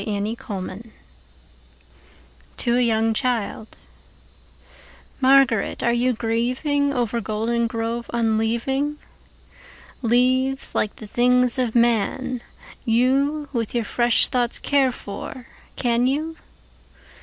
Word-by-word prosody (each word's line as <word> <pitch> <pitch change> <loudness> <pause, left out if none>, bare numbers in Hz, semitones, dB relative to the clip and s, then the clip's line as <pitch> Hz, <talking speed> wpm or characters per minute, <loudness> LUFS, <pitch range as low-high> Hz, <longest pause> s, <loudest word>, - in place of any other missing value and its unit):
Spring 205 -1 -2
and 230 +2 -5
Fall 190 -3 -6 1.8
to 240 -1 +2
a - - +3
young 225 -1 +2
childMÁRGARÉT, 225 -2 -1 2.1
áre 235 0 0
you 250 +1 +1
gríevingOver 245 +1 0
Goldengrove 230 +2 -2
unleaving? 235 +5 0 1.1
Leáves, 255 +3 +1
líke 210 - 0
the 220 - -10
things 250 +3 +3
of 245 -3 -1
man, 240 +2 +1 0.5
youWith 265 +1 +1
your 235 - +1
fresh 240 +2 +3
thoughts 245 -2 0
care 275 -2 +2
for, 240 +3 -8 0.3
can 240 0 +1
you? 310 +5 -1
240 Hz, 90 wpm, -22 LUFS, 225-255 Hz, 2.1 s, a